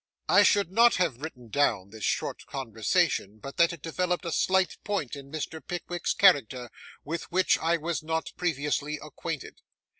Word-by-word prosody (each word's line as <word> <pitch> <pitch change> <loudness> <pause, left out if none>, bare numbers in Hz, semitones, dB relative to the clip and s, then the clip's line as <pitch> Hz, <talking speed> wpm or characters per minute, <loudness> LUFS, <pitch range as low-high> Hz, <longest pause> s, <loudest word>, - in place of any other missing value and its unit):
I - - +6
should 200 -4 +3
not 235 +4 +5
have 160 -9 0
written 125 -7 -8
down 105 -8 +1
this 110 -2 -10
short - - -2
conversation, 110 -4 0
but 135 +5 -9
that 170 0 +5
it 170 -4 -10
developed 180 +2 -1
a 170 - -2
slight 190 +3 +1
point 195 - -2
in 140 -1 -11
Mr. 160 +1 -5
Pickwick's 175 0 -3
character, 130 - +3 0.3
with 165 +3 -5
which 185 +2 +3
I 165 +1 +2
was 165 +1 -3
not 160 +1 -2
previously 150 -2 -1
acquainted. 150 0 -7
160 Hz, 160 wpm, -28 LUFS, 135-175 Hz, 0.3 s, I